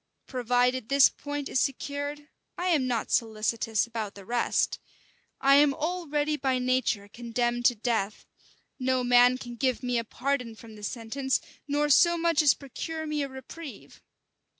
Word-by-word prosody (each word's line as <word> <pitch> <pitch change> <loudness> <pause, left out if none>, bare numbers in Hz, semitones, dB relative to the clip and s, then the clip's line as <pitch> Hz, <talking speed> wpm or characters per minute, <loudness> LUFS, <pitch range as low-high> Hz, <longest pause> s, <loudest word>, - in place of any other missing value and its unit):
Provided 250 -1 0
this 280 -1 +6
point 290 -1 -5
is - - 0
secured, 285 +2 -3 0.3
I 360 +1 -1
am 295 -7 +2
not 235 -3 -2
solicitous 220 -1 0
about 225 -3 -5
the 200 -1 -12
rest. 240 +3 0 0.6
I 275 +1 +6
am 285 -1 +4
already 305 -2 -1
by 265 -3 0
nature 250 -5 0
condemned 240 +2 -2
to 245 - +5
death: 215 -2 -2 0.5
no 255 0 +1
man 245 +1 +5
can 240 -2 -8
give 255 0 0
me 245 -1 0
a - - -3
pardon 250 0 -2
from 220 0 -13
this 210 -1 -5
sentence; 265 +3 -2 0.3
nor 295 +1 +1
so 340 +4 +5
much 335 -1 +2
as 290 -3 +5
procure 315 +4 -6
me 300 -1 -2
a 280 - -2
reprieve. 265 +3 -10
255 Hz, 155 wpm, -28 LUFS, 235-290 Hz, 0.6 s, this